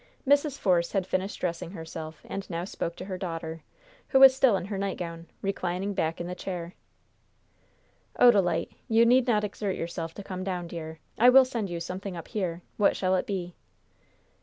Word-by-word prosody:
Mrs. 285 Hz, 0 st, +3 dB
Force 175 Hz, -6 st, +1 dB
had 195 Hz, -2 st, +1 dB
finished 190 Hz, +2 st, -2 dB
dressing 170 Hz, -1 st, -3 dB
herself, 160 Hz, -3 st, -8 dB
and 195 Hz, -1 st, -5 dB
now 170 Hz, 0 st, -3 dB
spoke 170 Hz, -3 st, -4 dB
to 185 Hz, -, -7 dB
her 185 Hz, -2 st, -5 dB
daughter, 165 Hz, -3 st, -5 dB, 0.5 s
who 265 Hz, -, +4 dB
was 265 Hz, -1 st, +9 dB
still 265 Hz, -6 st, +4 dB
in 180 Hz, -, -5 dB
her 200 Hz, 0 st, -4 dB
nightgown, 170 Hz, -4 st, -4 dB, 0.2 s
reclining 195 Hz, 0 st, -2 dB
back 160 Hz, -3 st, -1 dB
in 175 Hz, -, -3 dB
the 180 Hz, -, -4 dB
chair. 180 Hz, -1 st, -5 dB, 1.5 s
"Odalite, 195 Hz, -9 st, +4 dB, 0.2 s
you 225 Hz, +1 st, +5 dB
need 250 Hz, +2 st, +4 dB
not 215 Hz, -3 st, +3 dB
exert 200 Hz, -1 st, -2 dB
yourself 165 Hz, -1 st, -5 dB
to 200 Hz, -, -7 dB
come 185 Hz, -1 st, -5 dB
down, 180 Hz, -2 st, -3 dB
dear. 160 Hz, -2 st, -7 dB, 0.2 s
I 245 Hz, +3 st, +8 dB
will 265 Hz, +1 st, +8 dB
send 230 Hz, -6 st, -3 dB
you 170 Hz, -1 st, -3 dB
something 180 Hz, +2 st, -5 dB
up 165 Hz, -, -9 dB
here. 180 Hz, -6 st, -3 dB
What 205 Hz, -, +4 dB
shall 185 Hz, -1 st, +1 dB
it 185 Hz, -, -1 dB
be?" 180 Hz, -3 st, -3 dB
185 Hz, 185 wpm, -28 LUFS, 170-205 Hz, 1.5 s, was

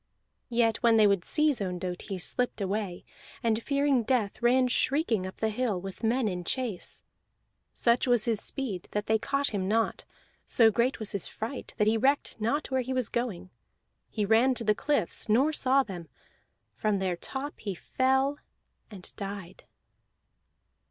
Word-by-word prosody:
Yet 230 Hz, -2 st, +2 dB
when 230 Hz, -2 st, +4 dB
they 215 Hz, -, +6 dB
would 200 Hz, -3 st, +3 dB
seize 300 Hz, -7 st, +2 dB
Ondott 180 Hz, -1 st, -3 dB
he 195 Hz, -, -2 dB
slipped 245 Hz, +7 st, 0 dB
away, 195 Hz, -2 st, -3 dB, 0.4 s
and 225 Hz, -1 st, +1 dB
fearing 280 Hz, -1 st, +2 dB
death 230 Hz, -2 st, 0 dB
ran 250 Hz, +2 st, +4 dB
shrieking 245 Hz, -, +1 dB
up 185 Hz, -, -8 dB
the 220 Hz, -, 0 dB
hill 215 Hz, -4 st, -1 dB
with 195 Hz, +1 st, -8 dB
men 235 Hz, +1 st, +2 dB
in 180 Hz, -3 st, -3 dB
chase. 230 Hz, -2 st, -3 dB, 0.7 s
Such 235 Hz, +2 st, +2 dB
was 245 Hz, -3 st, +3 dB
his 225 Hz, -3 st, 0 dB
speed 225 Hz, -11 st, -3 dB
that 210 Hz, 0 st, -1 dB
they 220 Hz, 0 st, +2 dB
caught 275 Hz, +3 st, 0 dB
him 195 Hz, -3 st, -2 dB
not, 225 Hz, +2 st, 0 dB, 0.4 s
so 225 Hz, -2 st, +4 dB
great 240 Hz, +4 st, +1 dB
was 215 Hz, -2 st, -4 dB
his 200 Hz, -, -3 dB
fright 230 Hz, +4 st, -6 dB
that 210 Hz, -, +3 dB
he 220 Hz, +1 st, +3 dB
recked 270 Hz, -2 st, +1 dB
not 275 Hz, +7 st, -1 dB
where 260 Hz, 0 st, +2 dB
he 255 Hz, +1 st, -3 dB
was 255 Hz, -4 st, 0 dB
going, 190 Hz, -7 st, -3 dB, 0.6 s
He 210 Hz, -2 st, -1 dB
ran 230 Hz, +5 st, +4 dB
to 235 Hz, -, -2 dB
the 210 Hz, -1 st, +3 dB
cliffs, 225 Hz, -, -1 dB
nor 265 Hz, +8 st, +3 dB
saw 270 Hz, -1 st, +3 dB
them; 175 Hz, -7 st, -8 dB, 0.7 s
from 215 Hz, -2 st, 0 dB
their 190 Hz, -2 st, -1 dB
top 270 Hz, +10 st, -6 dB
he 200 Hz, -3 st, -4 dB
fell 265 Hz, +7 st, +1 dB, 0.5 s
and 195 Hz, -4 st, -10 dB
died. 195 Hz, -3 st, -7 dB
225 Hz, 165 wpm, -28 LUFS, 200-260 Hz, 0.7 s, they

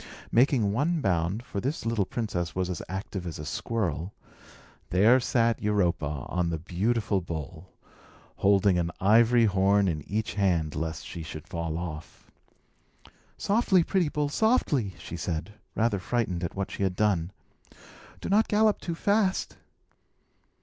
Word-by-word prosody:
Making 120 Hz, -4 st, +3 dB
one 155 Hz, +8 st, +1 dB
bound 95 Hz, -, 0 dB
(for 100 Hz, -, -4 dB
this 135 Hz, +2 st, -3 dB
little 115 Hz, -4 st, +1 dB
princess 90 Hz, -8 st, -3 dB
was 90 Hz, 0 st, -1 dB
as 85 Hz, -, -4 dB
active 95 Hz, -1 st, -5 dB
as 80 Hz, -, -5 dB
a 75 Hz, -, -7 dB
squirrel), 90 Hz, -1 st, -2 dB, 0.8 s
there 110 Hz, +8 st, +5 dB
sat 115 Hz, -2 st, +1 dB
Europa 85 Hz, -9 st, 0 dB
on 90 Hz, -1 st, -1 dB
the 85 Hz, -, -1 dB
beautiful 100 Hz, +5 st, 0 dB
bull, 85 Hz, +1 st, -7 dB, 0.7 s
holding 100 Hz, -2 st, +3 dB
an 85 Hz, -1 st, 0 dB
ivory 115 Hz, +4 st, +5 dB
horn 100 Hz, 0 st, +3 dB
in 80 Hz, -4 st, -1 dB
each 105 Hz, +2 st, -2 dB
hand, 90 Hz, -6 st, +1 dB
lest 80 Hz, -1 st, -4 dB
she 85 Hz, -, -7 dB
should 80 Hz, -1 st, -8 dB
fall 85 Hz, -1 st, -3 dB
off. 80 Hz, -2 st, -8 dB, 1.1 s
"Softly, 200 Hz, -4 st, +3 dB
pretty 180 Hz, -3 st, +1 dB
bull, 145 Hz, 0 st, -1 dB
softly!" 145 Hz, -, +1 dB
she 85 Hz, -, -7 dB
said, 85 Hz, +3 st, -4 dB, 0.2 s
rather 110 Hz, -3 st, +1 dB
frightened 95 Hz, -4 st, -1 dB
at 85 Hz, -, -4 dB
what 100 Hz, 0 st, -3 dB
she -, -, -6 dB
had 95 Hz, -2 st, 0 dB
done. 90 Hz, -5 st, +1 dB, 0.9 s
"Do -, -, -4 dB
not 210 Hz, +3 st, +3 dB
gallop 215 Hz, 0 st, +3 dB
too 170 Hz, -, -3 dB
fast." 200 Hz, +1 st, +1 dB
100 Hz, 145 wpm, -27 LUFS, 85-120 Hz, 1.1 s, there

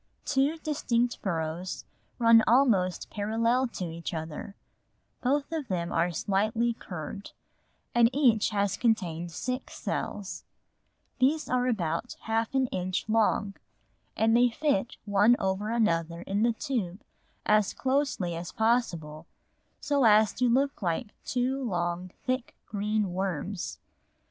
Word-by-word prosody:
Two 285 Hz, +3 st, +1 dB
distinct 245 Hz, -6 st, -1 dB
burrows 170 Hz, 0 st, -3 dB, 0.3 s
run 230 Hz, -1 st, +6 dB
almost 220 Hz, -8 st, +3 dB
parallel 230 Hz, +5 st, +1 dB
to 195 Hz, -6 st, -5 dB
each 165 Hz, 0 st, -5 dB
other; 160 Hz, +5 st, -6 dB, 0.7 s
both 280 Hz, +4 st, 0 dB
of 315 Hz, -5 st, -3 dB
them 175 Hz, -4 st, -2 dB
are 170 Hz, +2 st, +2 dB
slightly 215 Hz, +7 st, 0 dB
curved 185 Hz, -1 st, -8 dB, 0.6 s
and 235 Hz, -1 st, +5 dB
each 250 Hz, -6 st, +3 dB
has 200 Hz, -2 st, 0 dB
contained 175 Hz, -7 st, 0 dB
six 255 Hz, +9 st, -4 dB
cells; 200 Hz, -2 st, -4 dB, 0.8 s
these 300 Hz, +4 st, +2 dB
are 250 Hz, 0 st, +1 dB
about 185 Hz, -1 st, -1 dB
half 225 Hz, +3 st, -1 dB
an 265 Hz, -1 st, +3 dB
inch 185 Hz, +1 st, -2 dB
long, 215 Hz, -2 st, +2 dB, 0.6 s
and 225 Hz, +1 st, +3 dB
they 245 Hz, +1 st, +5 dB
fit 240 Hz, -3 st, 0 dB
one 205 Hz, +3 st, +5 dB
over 190 Hz, +2 st, -1 dB
another 170 Hz, -7 st, 0 dB
in 200 Hz, +2 st, -1 dB
the 235 Hz, +1 st, +3 dB
tube 215 Hz, -6 st, -3 dB, 0.4 s
as 210 Hz, -2 st, +3 dB
closely 260 Hz, -, 0 dB
as 170 Hz, +1 st, -6 dB
possible 170 Hz, -10 st, 0 dB, 0.5 s
so 285 Hz, -2 st, +1 dB
as 215 Hz, -1 st, +5 dB
to 250 Hz, -1 st, +1 dB
look 275 Hz, +3 st, +1 dB
like 190 Hz, +5 st, -2 dB
two 260 Hz, +2 st, -1 dB
long 175 Hz, -4 st, -2 dB, 0.2 s
thick 255 Hz, -1 st, -2 dB
green 210 Hz, -2 st, -1 dB
worms. 185 Hz, -, -3 dB
215 Hz, 125 wpm, -28 LUFS, 180-245 Hz, 0.8 s, run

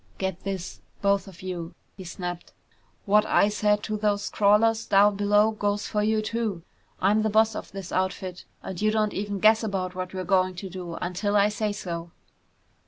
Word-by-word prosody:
"Get 190 Hz, -2 st, -3 dB
this, 195 Hz, -2 st, -5 dB, 0.2 s
both 200 Hz, 0 st, +2 dB
of 185 Hz, -1 st, -13 dB
you!" 175 Hz, -2 st, -5 dB, 0.2 s
he 190 Hz, -, -9 dB
snapped. 175 Hz, 0 st, -6 dB, 0.5 s
"What 210 Hz, 0 st, +4 dB
I 205 Hz, -, +3 dB
said 210 Hz, 0 st, +1 dB
to 215 Hz, -1 st, -2 dB
those 205 Hz, -1 st, 0 dB
crawlers 220 Hz, +2 st, +3 dB
down 205 Hz, +1 st, +5 dB
below 205 Hz, +2 st, +3 dB
goes 205 Hz, -1 st, -1 dB
for 210 Hz, -, -1 dB
you 215 Hz, +1 st, +1 dB
too. 215 Hz, -6 st, -2 dB, 0.4 s
I'm 205 Hz, +3 st, +3 dB
the 220 Hz, -, +1 dB
boss 220 Hz, +1 st, +3 dB
of -, -, -7 dB
this 195 Hz, -2 st, -7 dB
outfit 185 Hz, -1 st, -2 dB, 0.2 s
and 190 Hz, -1 st, -6 dB
you 215 Hz, -, +3 dB
don't 215 Hz, -1 st, +1 dB
even 205 Hz, 0 st, -3 dB
guess 215 Hz, +3 st, +5 dB
about 190 Hz, -4 st, -2 dB
what 185 Hz, 0 st, -5 dB
we're 185 Hz, -, -3 dB
going 185 Hz, 0 st, +2 dB
to 190 Hz, +2 st, -6 dB
do, 175 Hz, -2 st, -6 dB
until 190 Hz, +5 st, -2 dB
I 205 Hz, 0 st, +5 dB
say 210 Hz, 0 st, -1 dB
so!" 170 Hz, -4 st, -5 dB
200 Hz, 185 wpm, -26 LUFS, 185-210 Hz, 0.5 s, down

